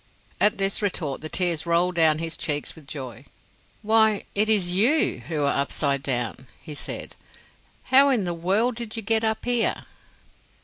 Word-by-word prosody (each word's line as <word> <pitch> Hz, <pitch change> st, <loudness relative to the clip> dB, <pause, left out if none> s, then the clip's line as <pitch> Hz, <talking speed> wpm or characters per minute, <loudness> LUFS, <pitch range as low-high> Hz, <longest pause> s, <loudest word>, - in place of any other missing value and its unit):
At 210 Hz, -, +3 dB
this 195 Hz, +1 st, 0 dB
retort 160 Hz, -9 st, -2 dB
the 155 Hz, -, -6 dB
tears 170 Hz, -2 st, 0 dB
rolled 170 Hz, +2 st, +2 dB
down 160 Hz, -3 st, +4 dB
his 165 Hz, 0 st, -3 dB
cheeks 150 Hz, -2 st, -2 dB
with 155 Hz, -4 st, -16 dB
joy. 130 Hz, -7 st, -8 dB, 0.6 s
"Why, 220 Hz, -1 st, +3 dB
it 210 Hz, +2 st, +2 dB
is 195 Hz, -5 st, +3 dB
you 235 Hz, -, +2 dB
who 150 Hz, -2 st, -2 dB
are 140 Hz, 0 st, +1 dB
up 140 Hz, -, -4 dB
side 140 Hz, -2 st, -1 dB
down," 125 Hz, -2 st, -3 dB
he 155 Hz, -, -10 dB
said; -, -, -6 dB, 0.7 s
"how 270 Hz, +2 st, +5 dB
in 245 Hz, -7 st, +1 dB
the 175 Hz, -1 st, -2 dB
world 195 Hz, +9 st, +1 dB
did 230 Hz, -1 st, -7 dB
you 225 Hz, -, -4 dB
get 225 Hz, +2 st, +1 dB
up 220 Hz, 0 st, -1 dB
here?" 245 Hz, -2 st, 0 dB
180 Hz, 175 wpm, -24 LUFS, 150-220 Hz, 0.7 s, how